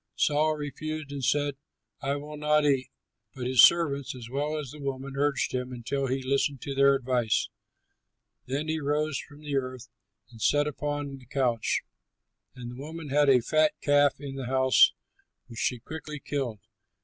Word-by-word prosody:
Saul 155 +1 +2
refused 150 +1 -5
and 140 -2 -5
said, 145 +2 +1 0.4
"I 140 0 0
will 150 +1 -7
not 150 0 +2
eat"; 135 -3 +2 0.5
but 130 -2 -5
his 125 -1 +5
servants, 140 -6 +4
as 120 -2 -9
well 145 +3 -1
as 145 -4 -5
the 150 - -11
woman, 135 -1 -4
urged 140 -2 0
him, 125 0 -2
until 130 +3 -2
he 130 +1 -2
listened 140 +1 0
to 140 - -4
their 140 0 +5
advice. 125 -4 0 1.0
Then 140 +4 -2
he 160 0 -1
rose 150 0 0
from 145 0 -12
the 145 -2 -2
earth 130 -2 -4 0.4
and 115 -2 -13
sat 145 +5 +3
upon 145 -1 -3
the 125 - -18
couch. 125 -4 0 0.7
And 120 -1 -7
the 125 +2 -9
woman 160 +1 -7
had 145 +1 +4
a 130 -2 +6
fat 155 +3 +3
calf 145 -1 +3
in 140 -1 -6
the 130 -2 -4
house 130 0 +5 0.5
which 115 - -9
she 125 - 0
quickly 150 +4 -7
killed. 130 -8 -3
140 Hz, 175 wpm, -28 LUFS, 130-150 Hz, 1.0 s, a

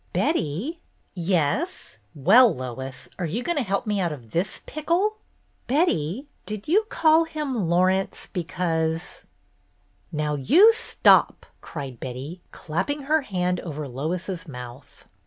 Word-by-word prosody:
"Betty?" 285 - -1 0.3
"Yes? 180 - -1 0.2
Well, 215 - +6
Lois, 130 +1 -6
are 175 - -1
you 220 +10 -3
going 345 0 0
to - - 0
help 200 +1 -1
me 210 -2 0
out 175 -3 0
of 120 -7 -9
this 190 +5 -2
pickle? 350 +8 0 0.2
" - - -41
"Betty, 260 - +1 0.2
did 210 -1 -5
you 410 +8 +3
call 320 0 +4
him 300 -4 -3
'Laurence' 185 +2 +1
be 180 -4 -4
cause 165 -1 -2 0.2
— - - -41
" - - -41 0.3
"Now 150 -2 -1
you 315 - +6
stop - - +3
!" - - -39
cried 135 -6 -7
Betty, 135 +8 -6
clapping 280 - -3
her 310 +3 +2
hand 180 -7 -1
over 150 -3 -5
Lois's 165 +7 -4
mouth. 125 -1 -10
180 Hz, 145 wpm, -24 LUFS, -, 0.3 s, Well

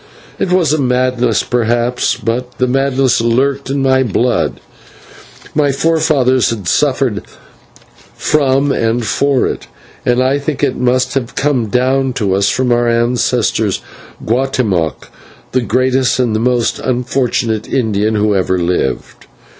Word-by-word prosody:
It 180 - -1
was 175 -5 +2
a 155 - 0
madness, 125 -3 +1
perhaps, 120 +1 0
but 125 +2 -3
the 125 - +1
madness 135 -1 +1
lurked 135 +4 0
in 135 0 -1
my 130 0 +3
blood; 120 0 0 0.9
my 145 -2 +2
forefathers 140 -4 +2
had 105 -6 -4
suffered - - +1 0.9
from 140 -1 +1
and 115 -1 0
for 140 +2 +1
it, - - -4 0.4
and 120 0 +1
I 130 +2 +2
think 145 0 -3
that 145 - +3
it 130 - -7
must 125 +1 +1
have 130 -3 -3
come 135 -6 0
down 130 +3 +1
to 100 -6 -1
us 100 +1 +2
from 130 +1 0
our 120 0 +2
ancestor, 120 -2 +1 0.6
Guatemoc, 115 - -1 0.4
the 130 - +1
greatest 130 +2 +1
and 120 -4 +1
most 120 0 0
unfortunate 120 -3 -1
Indian 110 -4 0
who 105 0 +1
ever 95 -1 0
lived. 85 -7 -2
125 Hz, 135 wpm, -14 LUFS, 115-135 Hz, 0.9 s, my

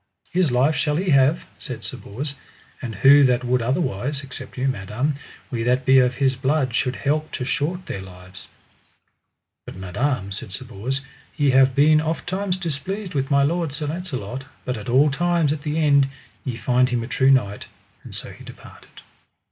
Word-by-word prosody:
His 175 -5 +2
life 130 +5 +3
shall 150 -2 +1
he 180 +2 0
have, 140 +4 +4
said - - -7
Sir - - -6
Bors, 135 +8 -6 0.5
and 115 -4 -5
who 140 +7 +7
that 125 -1 +2
would 125 0 +1
otherwise, 135 - -1
except 130 -1 -8
you, 130 +1 0
madam, 120 +4 -1 0.4
we 120 -3 -2
that 125 +2 +1
be 135 0 +7
of 125 0 +3
his 135 -2 +2
blood 135 -1 0
should 125 +1 0
help 150 +2 -1
to 125 - -3
short 165 +6 -1
their 100 - -5
lives. 95 0 -9 1.2
But - - -10
madam, 100 +3 -2
said 100 0 -5
Sir 130 +5 -6
Bors, 125 +4 -4 0.4
ye 145 -3 +3
have 130 0 +5
been 155 +2 +5
oft 160 +1 -2
times 190 0 -1
displeased 185 +4 -4
with 135 -2 -1
my 140 0 +4
lord, 165 0 0
Sir 150 +1 -4
Launcelot, 135 - -5 0.2
but 125 - -1
at 105 +2 -7
all 140 +4 +5
times 170 0 +2
at 150 - -6
the 150 0 -2
end 140 -3 +4 0.4
ye 125 - -3
find 125 +3 +2
him 120 -2 -1
a - - -6
true 130 0 +2
knight: 105 -7 +2 0.4
and - - -9
so - - -6
he - - -13
departed. - - -14
135 Hz, 190 wpm, -23 LUFS, 125-150 Hz, 1.2 s, who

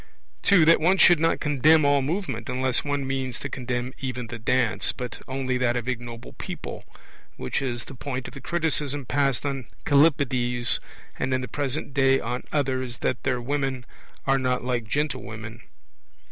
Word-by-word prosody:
(2) 180 -5 +5
That 165 0 +6
one 180 +4 +4
should 175 -4 +7
not 165 +1 +2
condemn 150 +1 +4
all 140 0 +4
movement, 140 - -3
unless 130 0 0
one 145 -1 -1
means 130 -2 -2
to 140 - -5
condemn 125 -1 -3
even 125 -2 -3
the 115 0 -7
dance, 115 -1 +1
but 125 -3 -7
only 130 -1 -1
that 120 -1 +2
of 120 -1 -2
ignoble 120 -1 -5
people - - -7 0.5
which 65 - -2
is 120 -3 -3
the - - -10
point 130 0 -4
of - - -10
the 140 - -9
criticism 150 -5 -1
passed 140 +1 +1
on 135 -4 -3 0.2
Callippides 130 -5 +3 0.4
and 130 - -1
in 130 - -1
the 125 - -4
present 140 +3 -3
day 135 -1 +4
on 125 +2 -3
others, 130 -4 -1
that 130 - 0
their 125 -2 0
women 135 0 -2 0.4
are 135 0 +3
not 125 -1 0
like 120 -2 -1
gentlewomen. 115 -4 -3
130 Hz, 170 wpm, -25 LUFS, 125-145 Hz, 0.5 s, should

